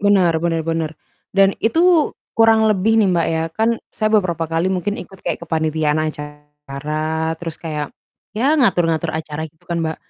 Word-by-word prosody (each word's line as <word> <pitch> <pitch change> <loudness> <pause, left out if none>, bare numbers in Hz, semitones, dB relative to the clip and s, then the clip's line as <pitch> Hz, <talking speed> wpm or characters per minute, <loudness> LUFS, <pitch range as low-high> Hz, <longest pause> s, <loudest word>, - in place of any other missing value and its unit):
Benar 190 -5 +3
benar 165 -1 0
benar, 165 -1 -1 0.5
dan 195 0 +5
itu 330 +5 +3 0.2
kurang 225 -1 +5
lebih 215 +1 +2
nih 215 -3 +4
Mbak, 170 -2 +2
ya 160 0 0
kan 220 +6 +1 0.2
saya 215 - 0
beberapa 175 -7 +1
kali 165 +3 0
mungkin 195 +3 -2
ikut 195 - -10
kayak - - -3
kepanitiaan 155 -1 0
acara 150 +1 -4
terus 165 -1 -7
kayak 150 -3 -4 0.4
ya 265 +8 +2
ngatur-ngatur 170 - +2
acara 155 0 -4
gitu 160 0 -14
kan, 170 -1 -1
Mbak. 160 0 -2
165 Hz, 160 wpm, -19 LUFS, 155-205 Hz, 0.5 s, dan